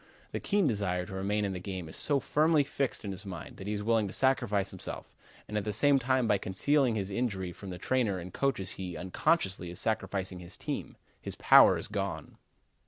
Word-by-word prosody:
The -, -, -3 dB
keen 205 Hz, -2 st, +1 dB
desire 100 Hz, -8 st, 0 dB
to 95 Hz, -, -9 dB
remain 100 Hz, +2 st, 0 dB
in 100 Hz, -, -2 dB
the 90 Hz, -, -4 dB
game 95 Hz, -2 st, -5 dB
is 80 Hz, -, -8 dB
so 145 Hz, -2 st, +2 dB
firmly 150 Hz, +3 st, +3 dB
fixed 140 Hz, -4 st, -2 dB
in 100 Hz, -, -3 dB
his 95 Hz, +1 st, -7 dB
mind 90 Hz, -5 st, -8 dB
that 95 Hz, -, -8 dB
he 105 Hz, -, -1 dB
is 105 Hz, 0 st, -3 dB
willing 110 Hz, -1 st, +2 dB
to 95 Hz, -, -6 dB
sacrifice 120 Hz, -8 st, +2 dB
himself, -, -, -6 dB, 0.3 s
and 105 Hz, -, -6 dB
at -, -, -4 dB
the 105 Hz, -, -2 dB
same 135 Hz, +6 st, +4 dB
time 130 Hz, -1 st, +1 dB
by 105 Hz, -3 st, +3 dB
concealing 125 Hz, +7 st, +2 dB
his 100 Hz, -2 st, -2 dB
injury 95 Hz, -5 st, -2 dB
from 95 Hz, +3 st, -9 dB
the 90 Hz, -, -6 dB
trainer 115 Hz, -3 st, 0 dB
and 90 Hz, 0 st, -8 dB
coaches 135 Hz, -9 st, 0 dB
he, 90 Hz, -2 st, -5 dB
unconsciously, 95 Hz, -, 0 dB
is 85 Hz, -, -7 dB
sacrificing 95 Hz, -4 st, -2 dB
his 90 Hz, 0 st, -8 dB
team; -, -, -5 dB, 0.2 s
his -, -, -6 dB
power -, -, +7 dB
is -, -, -3 dB
gone. -, -, -4 dB
105 Hz, 215 wpm, -30 LUFS, 95-130 Hz, 0.3 s, power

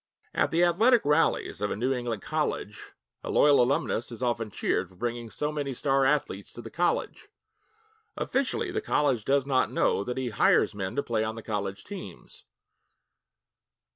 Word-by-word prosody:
At -, -, +1 dB
the 170 Hz, +2 st, +2 dB
athletic 220 Hz, -, +4 dB
rallies 150 Hz, -7 st, +1 dB
of 105 Hz, -, 0 dB
a -, -, -2 dB
New 125 Hz, +6 st, 0 dB
England 120 Hz, -5 st, -3 dB
college, -, -, -3 dB, 0.3 s
a -, -, -5 dB
loyal 145 Hz, -3 st, +5 dB
alumnus 125 Hz, -2 st, 0 dB
is 120 Hz, +2 st, -6 dB
often 120 Hz, -2 st, -1 dB
cheered 95 Hz, -2 st, -1 dB
for 95 Hz, -, -20 dB
bringing 120 Hz, +2 st, -4 dB
so 150 Hz, +6 st, -2 dB
many 145 Hz, -3 st, -3 dB
star 135 Hz, +1 st, +2 dB
athletes 140 Hz, -8 st, 0 dB
to 120 Hz, -, -8 dB
the 115 Hz, -, -9 dB
college. 175 Hz, +2 st, -1 dB, 0.9 s
Officially, 270 Hz, +7 st, -1 dB
the 425 Hz, +3 st, -2 dB
college 140 Hz, -, +1 dB
does 140 Hz, +2 st, +2 dB
not 130 Hz, -2 st, +1 dB
know 100 Hz, -, +1 dB
that 125 Hz, +4 st, -4 dB
he 130 Hz, -2 st, -1 dB
hires 105 Hz, -, +3 dB
men 95 Hz, -2 st, -4 dB
to 140 Hz, -, 0 dB
play 110 Hz, -2 st, 0 dB
on 110 Hz, 0 st, -3 dB
the 115 Hz, -, -8 dB
college 100 Hz, -3 st, -3 dB
teams. 185 Hz, -, -10 dB
125 Hz, 170 wpm, -27 LUFS, 110-150 Hz, 0.9 s, loyal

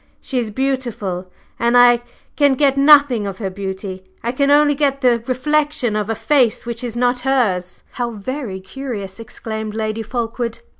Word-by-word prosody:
She 260 Hz, -, -2 dB
is 230 Hz, -3 st, -2 dB
beautiful, 230 Hz, -7 st, -3 dB, 0.3 s
and 235 Hz, +1 st, +3 dB
I 240 Hz, -1 st, +6 dB, 0.3 s
can 285 Hz, -2 st, +4 dB
get 275 Hz, 0 st, +3 dB
nothing 275 Hz, -6 st, +5 dB
of 195 Hz, -1 st, -5 dB
her 195 Hz, -3 st, -4 dB
beauty, 190 Hz, -1 st, -6 dB, 0.2 s
I 235 Hz, -, 0 dB
can 280 Hz, +2 st, +1 dB
only 290 Hz, 0 st, +5 dB
get 275 Hz, -1 st, 0 dB
the 240 Hz, -3 st, +3 dB
reflection 290 Hz, -2 st, 0 dB
of 210 Hz, 0 st, -2 dB
a 225 Hz, -, 0 dB
face 245 Hz, -2 st, +2 dB
which 235 Hz, 0 st, -4 dB
is 240 Hz, -1 st, -4 dB
not 245 Hz, 0 st, +2 dB
hers." 230 Hz, -9 st, 0 dB
"How 240 Hz, -1 st, -3 dB
very 225 Hz, -1 st, -5 dB
curious!" 200 Hz, -2 st, -6 dB
exclaimed 220 Hz, -2 st, -6 dB
Lady 220 Hz, 0 st, -2 dB
Fulkeward. 235 Hz, -, -4 dB
240 Hz, 165 wpm, -19 LUFS, 215-270 Hz, 0.3 s, I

